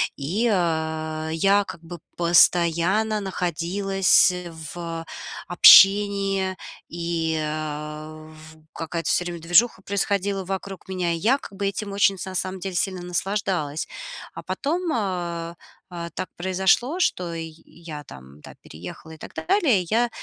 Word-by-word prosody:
И, 200 Hz, +12 st, -1 dB
а, 160 Hz, -3 st, -1 dB
я 200 Hz, +4 st, +3 dB
как 180 Hz, -3 st, -9 dB
бы 170 Hz, 0 st, -9 dB, 0.2 s
постоянно 175 Hz, +5 st, +3 dB
находилась 190 Hz, +1 st, +2 dB, 0.4 s
в, 165 Hz, -1 st, -6 dB, 0.4 s
общении, 195 Hz, +1 st, +6 dB, 0.3 s
и, 170 Hz, -1 st, -2 dB
э, 155 Hz, 0 st, -5 dB
в 155 Hz, 0 st, -15 dB
какая-то 165 Hz, 0 st, -4 dB
всё 180 Hz, -, +2 dB
время 175 Hz, -1 st, -6 dB
движуха 190 Hz, +5 st, +3 dB
происходила 200 Hz, 0 st, -1 dB
вокруг 195 Hz, +1 st, -6 dB
меня, 180 Hz, -2 st, -1 dB
и -, -, -2 dB
я 235 Hz, +11 st, +2 dB
как 200 Hz, -, -12 dB
бы 200 Hz, 0 st, -1 dB
этим 200 Hz, +1 st, -4 dB
очень 200 Hz, 0 st, +2 dB
са 185 Hz, +1 st, -6 dB
сам 185 Hz, +1 st, -1 dB
деле 190 Hz, -1 st, -5 dB
сильно 185 Hz, 0 st, -1 dB
наслаждалась. 175 Hz, -4 st, -2 dB, 0.5 s
А -, -, -7 dB
потом, 335 Hz, +4 st, -2 dB
а, 175 Hz, -5 st, -3 dB, 0.3 s
а, 170 Hz, -1 st, -6 dB
так -, -, -5 dB
произошло, 190 Hz, -, +1 dB
что 180 Hz, -, 0 dB
ий 165 Hz, -1 st, -6 dB
я 155 Hz, -4 st, -10 dB
там, 65 Hz, +2 st, -13 dB
да, -, -, -12 dB
переехала 90 Hz, -, -10 dB
и 160 Hz, -, -11 dB
так -, -, -11 dB
далее. 330 Hz, -, +2 dB
Я, 235 Hz, +2 st, +2 dB
180 Hz, 135 wpm, -24 LUFS, 165-195 Hz, 0.5 s, общении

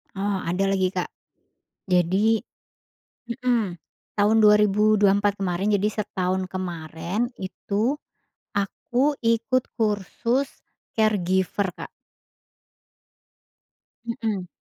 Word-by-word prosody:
Oh 200 Hz, 0 st, 0 dB
ada 180 Hz, +4 st, 0 dB
lagi, 190 Hz, -1 st, +1 dB
Kak. 180 Hz, -1 st, -2 dB, 0.8 s
Jadi 190 Hz, +5 st, +3 dB, 0.9 s
mhm, 235 Hz, -6 st, 0 dB, 0.4 s
tahun 210 Hz, +1 st, +4 dB
2024 210 Hz, -1 st, +4 dB
kemarin 195 Hz, +2 st, 0 dB
jadi 205 Hz, +1 st, +2 dB
setahun 185 Hz, -2 st, -1 dB
kemarin 175 Hz, +4 st, -3 dB
itu 205 Hz, +7 st, -1 dB, 0.6 s
aku 245 Hz, +8 st, 0 dB, 0.2 s
ikut 250 Hz, +3 st, +1 dB, 0.2 s
kursus 225 Hz, +5 st, 0 dB, 0.5 s
caregiver, 190 Hz, -3 st, +1 dB
Kak. -, -, -8 dB, 2.2 s
Mhm. 225 Hz, -6 st, -2 dB
205 Hz, 80 wpm, -24 LUFS, 185-220 Hz, 2.2 s, tahun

